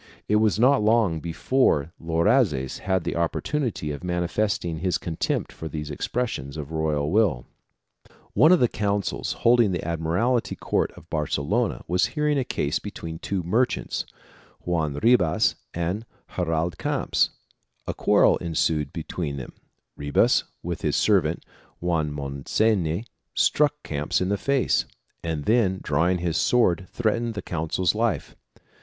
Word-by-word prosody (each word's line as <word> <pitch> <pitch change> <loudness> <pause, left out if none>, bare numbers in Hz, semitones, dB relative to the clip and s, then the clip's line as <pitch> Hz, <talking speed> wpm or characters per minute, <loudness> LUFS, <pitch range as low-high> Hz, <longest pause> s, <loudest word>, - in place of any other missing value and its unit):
It 105 - +3
was 110 -2 +3
not 130 +3 +4
long 105 -6 +3
before 85 - +1
Loazes 80 - +1
had 95 -2 0
the 85 - -3
opportunity 85 - -1
of 70 +2 -7
manifesting 90 0 -1
his 90 +1 0
contempt 80 -2 -2
for 80 - -7
these 75 0 -5
expressions 75 - -3
of 75 -2 -6
the - - -9
royal 75 -2 0
will. 95 - +2 0.9
One 155 - +6
of 180 - +6
the 125 - +4
consuls 100 -3 -1
holding 120 -3 +5
the 85 - -3
admiralty 85 +10 0
court - - 0
of 80 - -15
Barcelona 80 - -1
was 90 +1 +2
hearing 150 -1 +2
a - - +1
case 75 -9 -1
between 80 -5 -7
two 95 -1 -2
merchants, 115 +9 0 0.6
Joan 80 -5 0
Ribas 110 - +3 0.2
and 85 +6 -2 0.3
Gerald 85 -1 -1
Camps: - - +1 0.6
a - - -2
quarrel - - +4
ensued 80 -3 0
between 80 -3 -4
them; 65 - -7 0.4
Ribas 70 0 +2 0.2
with - - -4
his - - 0
servant - - +2 0.3
Joan 80 -4 0
Monseny 80 +7 0 0.3
struck 150 0 +2
Camps 75 0 -1
in 90 - -1
the 100 - +1
face 140 -2 +1 0.4
and 80 -3 -3
then 105 -5 +2
drawing 85 +6 +2
his 85 -2 -1
sword, 95 -8 +2
threatened 115 0 -1
the 100 - -4
consul's 85 +2 0
life. 115 +1 -1
90 Hz, 140 wpm, -25 LUFS, 80-110 Hz, 0.9 s, One